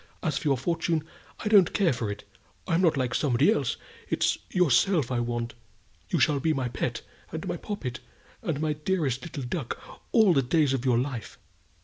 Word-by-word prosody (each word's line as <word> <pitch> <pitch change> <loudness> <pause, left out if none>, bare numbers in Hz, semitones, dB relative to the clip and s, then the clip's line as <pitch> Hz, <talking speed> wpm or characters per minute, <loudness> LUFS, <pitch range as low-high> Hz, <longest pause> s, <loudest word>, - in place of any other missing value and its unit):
As 155 -5 0
for - - -3
your 135 -2 +3
fortune, 165 +3 0 0.4
I - - -3
don't 200 -5 +6
care 195 -5 +3
that - - -1
for 115 -4 -3
it! 100 0 -6 0.4
I'm 165 +2 +2
not 165 -5 +3
like 125 -2 0
somebody 125 -4 +3
else; 140 -5 0 0.3
it's - - +1
yourself 175 -3 +3
I 125 - +1
want. 120 0 -2 0.6
You - - +1
shall 150 -3 +3
be 160 +3 +1
my 130 -4 -1
pet, - - -3 0.3
and - - -5
my - - -1
poppet, 135 -12 -5 0.4
and 165 -10 -2
my 155 -1 0
dearest 150 -4 -1
little 155 -5 -6
duck 125 +1 -4 0.3
all 215 -6 +6
the 135 - +4
days 140 +2 +2
of 135 -1 -2
your 125 -2 +3
life." 125 -3 -3
145 Hz, 195 wpm, -27 LUFS, 125-170 Hz, 0.6 s, don't